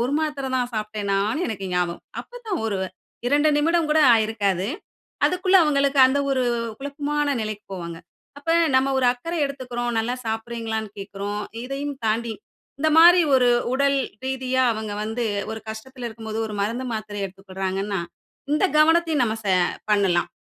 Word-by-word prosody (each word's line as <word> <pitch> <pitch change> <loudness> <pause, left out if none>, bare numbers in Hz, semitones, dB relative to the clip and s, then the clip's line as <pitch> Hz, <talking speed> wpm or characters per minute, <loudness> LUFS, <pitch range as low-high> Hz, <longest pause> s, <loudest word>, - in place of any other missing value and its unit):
ஒரு 255 +4 -1
மாத்திர 295 -4 -2
தான் 245 -1 -1
சாப்பிட்டேனான்னு 215 - -1
எனக்கு 195 -3 -4
ஞாபகம். 175 -1 -1 0.2
அப்ப - - -11
தான் 380 - 0
வரு 210 -3 -1 0.5
2 290 +4 +3
நிமிடம் 325 +2 +2
கூட 310 - +4 0.2
ஆகியிருக்காது. 210 -4 +1 0.6
அதுக்குள்ள 370 +1 +3
அவுங்களுக்கு 280 -2 +2
அந்த 265 +2 +1
ஒரு 260 -1 +1 0.4
குழப்பமான 290 +1 -2
நிலைக்கு 215 -1 -5
போவாங்க. 170 -2 -6 0.4
அப்ப 290 +3 -3 0.3
நம்ம 260 +1 +3
ஒரு 255 - +3
அக்கறை 330 +8 -5
எடுத்துக்குறோம், 250 -3 -4
நல்லா 235 +3 0
சாப்பிடுகிறீங்களான்னு 225 -1 -3
கேட்குறோம். 200 +1 -4 0.2
இதையும் 275 +2 -4
தாண்டி 225 +1 0 0.5
இந்தமாரி 325 +4 +7
ஒரு 250 -1 +5 0.3
உடல் 275 +1 +2 0.3
ரீதியா 260 -1 0
அவங்க 220 -1 -4
வந்து 225 +3 -3 0.3
ஒரு 220 0 -5
கஷ்டத்தில 245 +3 -7
இருக்கும்போது 220 0 -6
ஒரு 215 - -6
மருந்து, 230 +5 -1
மாத்திரை 210 -1 -5
எடுத்துக்கொள்றாங்கன்னா, 195 0 -3 0.5
இந்த 305 - +2
கவனத்தையும் 320 -2 +4
நம்ம 220 0 -1
ச - - -5 0.4
பண்ணலாம். 195 -4 +2
240 Hz, 140 wpm, -23 LUFS, 210-285 Hz, 0.6 s, இந்தமாரி